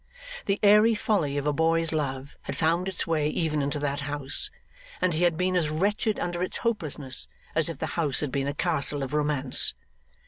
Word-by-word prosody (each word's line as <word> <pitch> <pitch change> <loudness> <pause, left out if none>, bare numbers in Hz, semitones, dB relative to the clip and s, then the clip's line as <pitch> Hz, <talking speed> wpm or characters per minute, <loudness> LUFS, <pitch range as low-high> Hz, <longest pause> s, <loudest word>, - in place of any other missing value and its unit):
The 195 0 +1
airy 210 +2 +6
folly 170 -10 0
of 140 - -2
a 150 - +2
boy's 165 +2 +2
love 140 -2 -3
had - - -5
found 170 +3 +1
its 190 -3 -1
way 155 -2 +1
even 155 -2 0
into 140 +1 -1
that 145 -1 -1
house, 145 - -1 0.5
and 185 -2 +2
he 165 +3 +2
had 170 -2 +2
been 185 +1 +1
as 165 -4 +2
wretched 205 +6 0
under 175 0 -2
its 185 - -1
hopelessness 155 - -1 0.3
as 160 0 +2
if 165 - -5
the 160 - -2
house 150 -6 +1
had 150 -3 -2
been 140 0 -1
a 140 - -1
castle 145 -4 0
of 130 - -5
romance. 145 -3 +1
155 Hz, 200 wpm, -27 LUFS, 145-180 Hz, 0.5 s, airy